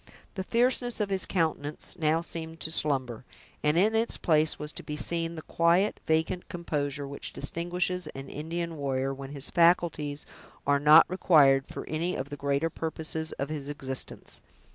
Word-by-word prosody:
The 190 - -3
fierceness 245 +2 +1
of 205 -2 -1
his 190 -1 +1
countenance 155 -4 -1
now 160 0 +1
seemed 165 -1 -6
to 160 - -2
slumber, 130 -7 0 0.4
and 150 +2 +2
in 210 +5 +4
its 225 +1 +2
place 155 -1 +2
was 150 0 -5
to - - -7
be 150 -1 -5
seen 165 +1 -1
the 160 - -7
quiet, 170 +5 +2
vacant 160 +3 0
composure 145 -5 -3
which 140 0 -7
distinguishes 180 +1 -2
an 135 0 -7
Indian 165 +3 -4
warrior, 135 -1 -1
when 135 0 -8
his 140 -1 -1
faculties 165 -4 +2 0.4
are 140 0 +3
not 150 +3 +8
required 145 -7 +4
for - - -7
any 165 +4 -1
of 135 +2 -5
the - - -3
greater 140 +3 0
purposes 160 0 -3
of 140 +1 -4
his 145 -2 -4
existence. 135 -3 -3
160 Hz, 165 wpm, -28 LUFS, 145-170 Hz, 0.4 s, not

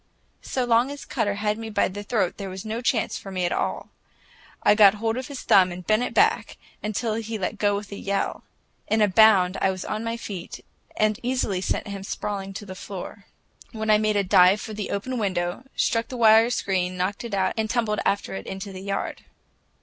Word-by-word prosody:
So 255 -2 -2
long 240 +2 +3
as 285 0 -8
Cutter 205 -1 -1
had 210 +1 -1
me 225 0 -6
by 215 - +2
the 205 +2 -6
throat, 205 -4 -1
there 195 -2 -5
was 185 +2 -7
no 220 +2 -3
chance 240 -2 0
for 195 - -10
me 185 -1 -1
at 175 - -1
all. - - -2 0.7
I - - +6
got 210 -1 +7
hold 225 +1 -1
of 255 +2 -4
his 280 -3 -7
thumb 185 -2 +5
and 175 0 -8
bent 215 +1 +3
it 250 - -3
back, 440 +3 +2 0.2
until 215 +2 -2
he 225 0 -3
let 205 +2 -3
go 205 -1 +2
with 205 0 -6
a 200 - -6
yell. 200 0 -2 0.4
In 220 - +1
a - - +5
bound, 195 -2 +5
I 195 - +3
was 185 -1 -4
on 215 +1 -3
my 230 0 -2
feet, 195 -6 -7 0.3
and 215 -1 +2
easily 240 -7 -1
sent 190 - -2
him 200 -1 -6
sprawling 195 0 -4
to 205 - -6
the 190 - -7
floor. 200 +1 -8 0.5
Then 220 -1 0
I 210 - +5
made 215 0 +1
a 200 - +2
dive 185 +1 +5
for 215 - -7
the 210 -1 -4
open 245 +5 -3
window, 185 +2 -2
struck 230 0 +1
the 255 - -7
wire 225 0 +6
screen, 185 -5 -1
knocked 190 +5 -2
it 230 -4 -3
out, 190 -1 +1
and 220 -1 -1
tumbled 225 -3 0
after 200 - 0
it 95 0 -6
into 195 +1 -6
the 185 - -8
yard. 195 0 -4
205 Hz, 220 wpm, -24 LUFS, 195-225 Hz, 0.7 s, got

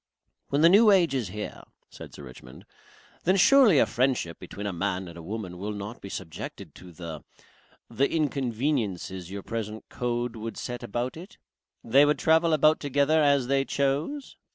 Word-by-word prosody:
"When 140 +1 +1
the 165 - +7
New 210 +4 +6
Age 180 -7 +4
is 125 -6 -1
here," 105 +3 -7 0.3
said - - -11
Sir 75 - -11
Richmond, 65 -1 -13 0.6
"then, 185 +3 +3
surely, 235 - +6
a - - +5
friendship 125 -10 -1
between 105 - -8
a 100 - -2
man 95 +1 -2
and 85 - -11
a 85 - -9
woman 95 -1 -6
will 105 +2 -4
not 105 +3 -7
be 100 - -8
subjected 85 -5 -7
to 90 -1 -13
the 85 -2 -8 0.6
the 140 - 0
inconveniences 120 - -2
your 100 0 -7
present 110 -1 -6
code 120 -1 -2
would 115 0 -6
set 120 -1 -5
about 120 +7 -4
it? 180 +4 -12 0.5
They 135 +5 +5
would 150 +1 +3
travel 160 +1 +3
about 155 0 +4
together 145 +2 +2
as 140 -3 +3
they 135 +1 +1
chose?" 140 - -2
120 Hz, 175 wpm, -27 LUFS, 100-150 Hz, 0.6 s, the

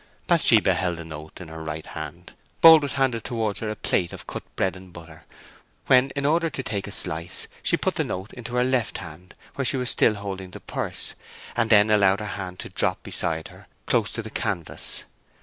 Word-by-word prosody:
Bathsheba - - +5
held 90 -2 -1
the 85 - -7
note 75 -1 -9
in 90 -3 -9
her 80 0 -7
right 80 0 -5
hand. - - -8 0.3
Boldwood 160 -4 +9
handed 130 -5 +1
towards 110 -4 -2
her 110 - -3
a 110 - -3
plate 90 -4 0
of - - -9
cut - - -5
bread 95 -1 0
and 95 -1 -12
butter; 80 -2 -12 0.6
when, 130 +1 +5
in 140 0 -1
order 165 +3 +2
to 135 -3 -5
take 105 -4 -3
a - - -7
slice, 85 -3 -1
she - - +2
put - - 0
the - - 0
note 95 +4 -5
into 120 0 -7
her 125 - +3
left 125 -5 0
hand, 90 0 -10 0.2
where 135 - -2
she 135 - +1
was 125 -1 +3
still 110 - +4
holding 95 -2 -6
the - - -9
purse, - - -3 0.4
and 115 -1 +1
then 105 -1 +6
allowed 100 -2 +4
her 105 - -4
hand 95 -3 -5
to - - -6
drop - - 0
beside 80 -1 -2
her - - -16 0.2
close 115 -4 +1
to 115 - -3
the 110 - -8
canvas. 95 -8 -3
105 Hz, 210 wpm, -25 LUFS, 90-120 Hz, 0.6 s, Boldwood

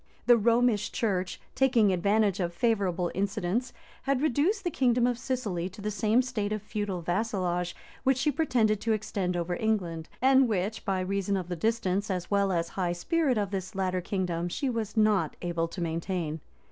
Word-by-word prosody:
The 240 - +7
Romish 230 -1 +2
church, 190 -5 -1
taking 240 -7 +3
advantage 200 +2 +2
of 175 -2 -2
favorable 190 -5 +1
incidents, 200 +5 -1 0.3
had 275 -1 0
reduced 310 - +1
the 350 - -1
kingdom 245 -3 +2
of 245 -1 0
Sicily 210 -10 -2
to 190 - -14
the 210 +1 -2
same 215 +4 +2
state 220 -5 -2
of 215 -1 -2
feudal 205 -4 -3
vassalage 180 -2 -1 0.3
which 265 -1 +3
she 270 +3 +2
pretended 235 -9 +1
to 225 - +1
extend 200 -4 -2
over 175 +1 -1
England; 175 -7 -1
and 265 +1 +5
which, 210 0 -2
by 190 -3 0
reason 195 +1 -1
of 180 -2 -5
the 175 - -2
distance, 205 0 0
as 180 -1 -3
well 200 -1 +2
as 170 -2 0
high 180 -3 -1
spirit 280 - +1
of 205 -2 -1
this 190 +1 -4
latter 185 -1 0
kingdom, 175 -2 -2
she 265 +8 -1
was 225 -2 -4
not 215 -2 +3
able 170 -1 -1
to 165 - -8
maintain. 165 -1 -2
205 Hz, 180 wpm, -28 LUFS, 180-230 Hz, 0.3 s, The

